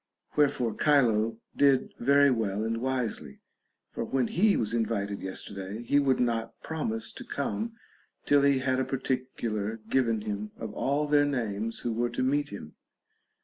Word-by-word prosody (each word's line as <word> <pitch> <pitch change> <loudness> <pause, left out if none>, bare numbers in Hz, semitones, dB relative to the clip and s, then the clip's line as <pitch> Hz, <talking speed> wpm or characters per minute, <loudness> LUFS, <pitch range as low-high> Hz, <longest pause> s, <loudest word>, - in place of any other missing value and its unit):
Wherefore 130 -6 +2
Chilo 115 -6 +3 0.2
did 140 -2 +3
very 140 +2 +5
well 110 -3 0
and 115 +1 -1
wisely; 130 -3 -3 0.5
for - - -3
when 130 -3 0
he 205 +3 +3
was 110 -1 -1
invited 105 -3 -1
yesterday, 95 +3 -5
he 145 +4 +3
would 135 -2 +2
not 115 -2 -1
promise 115 -9 -3
to - - -9
come 220 +11 -3 0.5
till 145 0 +5
he 140 -1 +4
had 130 0 0
a - - +2
particular 125 -5 -2
given 115 -5 +2
him 105 0 -4
of 110 -2 -6
all 140 +5 0
their 145 0 +4
names 115 -5 -2
who 120 - -1
were 120 +2 0
to 120 - -2
meet 145 +3 +1
him. 75 -7 -9
120 Hz, 155 wpm, -28 LUFS, 110-140 Hz, 0.5 s, very